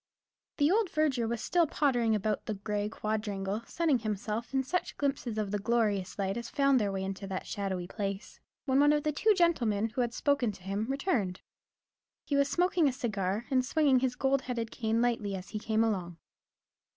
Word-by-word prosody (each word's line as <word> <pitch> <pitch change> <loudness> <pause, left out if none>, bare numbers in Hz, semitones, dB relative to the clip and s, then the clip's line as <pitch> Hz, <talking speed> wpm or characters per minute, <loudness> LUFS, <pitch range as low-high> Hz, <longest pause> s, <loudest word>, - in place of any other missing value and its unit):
The 290 +2 +3
old 425 -1 +2
verger 285 -8 +1
was 235 0 -3
still 345 -2 +3
pottering 245 -7 +2
about 210 0 -1
the 215 - -2
grey 205 +1 -2
quadrangle, 210 -1 -2
sunning 320 -7 +1
himself 215 +1 -3
in 265 -1 +1
such 360 +7 -2
glimpses 275 -5 -1
of 210 -2 -1
the 205 - 0
glorious 210 -3 0
light 195 +1 -1
as 235 0 -5
found 275 -2 +3
their 200 -1 0
way 190 -1 -3
into 195 +1 -5
that 190 -1 -4
shadowy 190 -3 -3
place, 200 +3 -5 0.3
when 265 -1 +3
one 290 +1 +6
of 295 -1 +1
the 305 - +1
two 420 +8 +3
gentlemen 235 - +2
who 235 +3 -2
had 235 -1 -1
spoken 280 -6 +1
to 190 - -15
him 200 +3 -2
returned. 265 - -1 0.8
He 285 - -1
was 280 0 +3
smoking 355 -2 +2
a - - -1
cigar, 215 -4 -2
and 255 -1 +3
swinging 280 -1 +3
his 250 -1 0
gold 270 +1 +1
headed 235 -3 -3
cane 225 0 0
lightly 220 -5 0
as 185 -1 -7
he 215 - -4
came 220 +1 +1
along. 180 -6 -2
230 Hz, 195 wpm, -30 LUFS, 205-275 Hz, 0.8 s, one